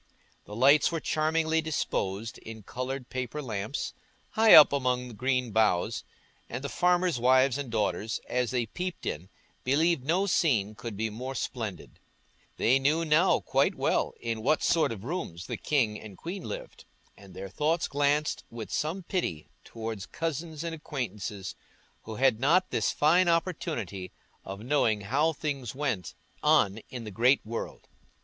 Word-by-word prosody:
The 105 - -9
lights 140 +8 +5
were 165 - -1
charmingly 160 +1 +1
disposed 115 -9 -2
in 110 -1 -10
coloured 130 +3 -5
paper 130 +3 -3
lamps, 110 -1 -4 0.4
high 220 0 +7
up 150 -2 +9
among 125 -2 0
green 125 +1 0
boughs, 105 -5 +1 0.5
and 125 +3 -5
the 140 - -3
farmers' 180 -4 +2
wives 130 +1 +4
and 140 -3 -4
daughters, 110 -1 -1
as 125 -1 0
they 125 -2 0
peeped 180 - -5
in, 85 +5 -4 0.3
believed 150 +2 +2
no 175 +8 +2
scene 120 - +2
could 115 -2 -7
be 110 +1 -1
more 130 +5 -5
splendid; 110 -5 -5 0.6
they 130 +4 +4
knew 155 +5 +2
now 160 +4 +4
quite - - +1
well - - 0
in 115 -1 -3
what 150 +7 +2
sort 165 -6 +3
of 105 -3 -6
rooms 115 - -4
the - - -4
king 115 -8 0
and 105 -4 -11
queen 180 +2 -6
lived, - - -7 0.3
and 100 -2 -15
their 95 +1 -6
thoughts 155 - 0
glanced 145 +1 +1
with 115 -2 -7
some 165 +5 -2
pity 165 - -3
towards 110 -3 -6
cousins 160 -1 -4
and 170 -1 -3
acquaintances 115 - -5 0.5
who 110 - -6
had 130 -2 +3
not 175 +8 +3
this - - +1
fine 175 +5 +4
opportunity 165 - -2 0.3
of 100 +1 -7
knowing 115 -4 +1
how 140 +10 +1
things 140 -6 -4
went 130 -10 -2 0.3
on 100 +2 +3
in 125 -2 -6
the 105 - -7
great 125 +7 +3
world. 115 +1 -6
130 Hz, 155 wpm, -28 LUFS, 110-155 Hz, 0.6 s, up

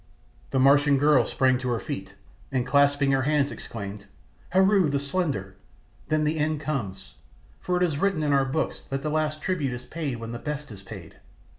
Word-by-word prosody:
The 135 - -1
Martian 140 +1 +5
girl 150 +2 +4
sprang 130 -2 +2
to 130 -1 -3
her 120 -2 0
feet, 95 -2 -6 0.4
and 130 -2 0
clasping 140 +1 +3
her 135 -1 +3
hands 145 +1 +1
exclaimed, 100 -2 -7 0.4
"Heru, 190 -2 +4
the 140 - +1
Slender! 140 - -2 0.5
Then 155 0 +1
the 155 +1 0
end 155 0 0
comes, 110 -12 -4 0.5
for 180 0 -1
it 180 - +2
is 155 -5 0
written 195 -5 +1
in 145 -1 +2
our 135 -1 +3
books 140 +4 -2
that 135 0 -3
the 155 - -1
last 155 0 -1
tribute 150 -9 -1
is 125 0 -7
paid 150 -6 -4
when 115 0 -6
the 120 - -5
best 150 -1 -5
is 100 -2 -9
paid. 95 -4 -11
140 Hz, 190 wpm, -26 LUFS, 125-155 Hz, 0.5 s, Martian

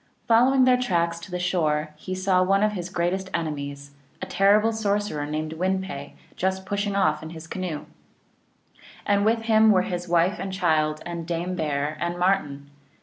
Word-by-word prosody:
Following 255 +3 +5
their 250 0 +4
tracks 170 -7 0
to 170 - -11
the 180 - -3
shore 155 -4 0
he 185 +5 -6
saw 185 0 +2
one 195 +2 +3
of 215 - +3
his 180 -3 -5
greatest 185 +1 -1
enemies, 140 -3 -4 0.3
a - - -4
terrible 205 +4 +3
sorcerer 205 -8 -1
named 155 +1 -3
Win 185 +3 0
pe, 145 -7 -7 0.2
just 190 +1 -1
pushing 200 0 -2
off 155 -6 +2
in 160 - -7
his 160 0 -9
canoe. 170 -3 -5 1.2
And 200 0 +2
with 225 +1 +2
him 220 -1 +5
were 185 -2 +4
his 175 -1 -4
wife 175 +3 +2
and 195 - -4
child 155 -5 +1
and 170 -1 -5
Dame 175 +1 -2
Bear 150 -2 -2
and 175 0 -2
Martin. 145 -7 0
180 Hz, 175 wpm, -25 LUFS, 160-195 Hz, 1.2 s, Following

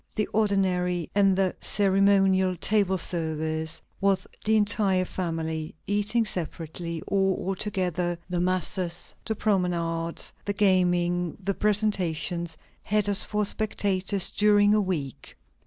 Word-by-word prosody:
The 210 - +1
ordinary 185 -5 +1
and 195 -1 +4
the 190 -2 +1
ceremonial 195 -2 +3
table 195 +1 +1
service 160 -2 -1 0.2
of 195 -1 +2 0.2
the 220 +1 +2
entire 205 -3 +2
family, 160 -4 -4
eating 210 +3 +1
separately 170 -2 -4
or 195 -1 +1
all 190 +2 -2
together, 180 -3 -2
the 180 -1 -2
masses, 180 -1 -1
the 220 - -2
promenades, 170 -5 -1
the 205 - -2
gaming, 180 -3 +2
the 200 0 -2
presentations, 180 -6 0 0.3
had 210 -1 +1
us 200 +1 +2
for 210 -1 -1
spectators 200 -2 0
during 205 0 +4
a 215 - +3
week." 160 - -4
185 Hz, 120 wpm, -26 LUFS, 175-205 Hz, 0.3 s, and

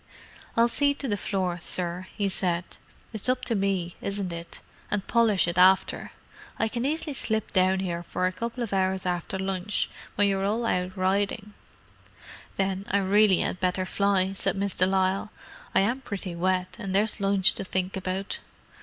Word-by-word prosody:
"I'll 230 +1 +6
see 285 +4 +2
to 280 - -4
the 205 - +1
floor, 185 -3 -2
sir," 180 +1 0
he 205 -2 +1
said. 180 -2 +1 0.5
"It's 220 +3 -1
up 255 0 0
to 235 - +1
me, 195 -4 -1
isn't 200 -3 -2
it? 170 0 -7 0.3
And 205 -2 -1
polish 225 -6 +3
it 170 +1 0
after. 185 +1 +4 0.5
I 225 - +1
can 240 +2 -2
easy 305 +1 -1
slip 220 -5 -1
down 190 0 +3
'ere 170 -2 -2
for 180 +1 -2
a 185 - +2
couple 235 +5 -4
of 220 - -4
hours 190 -1 +1
after 180 +1 -2
lunch, 190 +1 -1 0.2
when 205 0 +3
you're 195 -1 0
all 220 +4 0
out 180 -2 -1
ridin'." 200 +2 0 1.0
"Then 195 0 -1
I 200 - +2
really 200 0 +4
had 180 - -2
better 185 0 0
fly," 195 -1 +1
said 195 - 0
Miss 200 0 -1
de 185 - +2
Lisle. 190 +1 +1 0.5
"I - - +6
am 235 +7 0
pretty 195 -7 -5
wet, 185 +1 -1
and 190 -1 -3
there's 210 +1 +2
lunch 195 -1 +4
to - - -4
think 185 0 -2
about." 190 +1 -3
195 Hz, 180 wpm, -27 LUFS, 185-205 Hz, 1.0 s, I'll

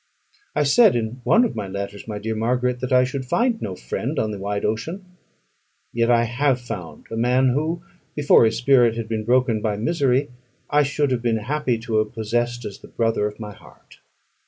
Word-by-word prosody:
I 150 - +2
said 195 - +5
in 120 +2 -3
one 240 +2 +4
of 230 - -3
my 105 -3 -4
letters, 100 +2 -6
my 105 -2 -4
dear 110 +2 -3
Margaret, 125 +3 0
that 130 0 -4
I 125 0 +5
should 130 +1 -3
find 230 - 0
no 95 - -4
friend 60 - -4
on 110 -1 0
the 105 - -6
wide 100 +1 -2
ocean; 160 - -3 0.9
yet 115 0 +1
I 120 -1 +4
have 125 +3 +1
found 90 -9 -8
a - - -3
man 125 +3 +3
who, 160 +6 -1 0.3
before 145 -5 +5
his 110 0 +1
spirit 120 -2 +4
had 115 -1 -4
been 110 -1 -3
broken 120 -2 +2
by 105 -2 -1
misery, 135 +2 +1 0.4
I 150 - +5
should 145 0 0
have 125 -2 0
been 115 -2 +1
happy 130 +2 -1
to 115 -1 -2
have 110 +1 0
possessed 120 +2 -2
as 100 - -7
the - - -13
brother 115 -2 0
of 105 +1 -9
my 105 -2 -7
heart. - - -19
120 Hz, 205 wpm, -22 LUFS, 110-130 Hz, 0.9 s, said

